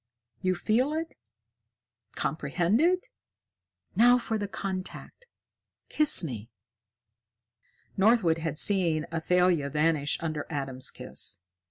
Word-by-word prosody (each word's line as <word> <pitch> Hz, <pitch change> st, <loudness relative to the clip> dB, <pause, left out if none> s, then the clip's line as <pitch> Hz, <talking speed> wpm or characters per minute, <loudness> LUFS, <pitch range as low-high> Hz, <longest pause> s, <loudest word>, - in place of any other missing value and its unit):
You 185 Hz, 0 st, 0 dB
feel 240 Hz, -, 0 dB
it? 325 Hz, +1 st, -4 dB, 1.0 s
Comprehend 170 Hz, -, 0 dB
it? 365 Hz, +5 st, +2 dB, 0.9 s
Now 245 Hz, +2 st, +6 dB
for 225 Hz, -3 st, -3 dB
the 205 Hz, -, -3 dB
contact 195 Hz, -, -6 dB, 0.6 s
kiss 305 Hz, -10 st, +5 dB
me!" 115 Hz, -7 st, -6 dB, 1.5 s
Northwood 195 Hz, -5 st, +3 dB
had 160 Hz, -2 st, -4 dB
seen 170 Hz, -5 st, +2 dB
Athalia 170 Hz, -2 st, +1 dB
vanish 150 Hz, 0 st, 0 dB
under 155 Hz, -3 st, -4 dB
Adam's 135 Hz, -4 st, -2 dB
kiss. 100 Hz, -, -4 dB
180 Hz, 95 wpm, -27 LUFS, 155-220 Hz, 1.5 s, Now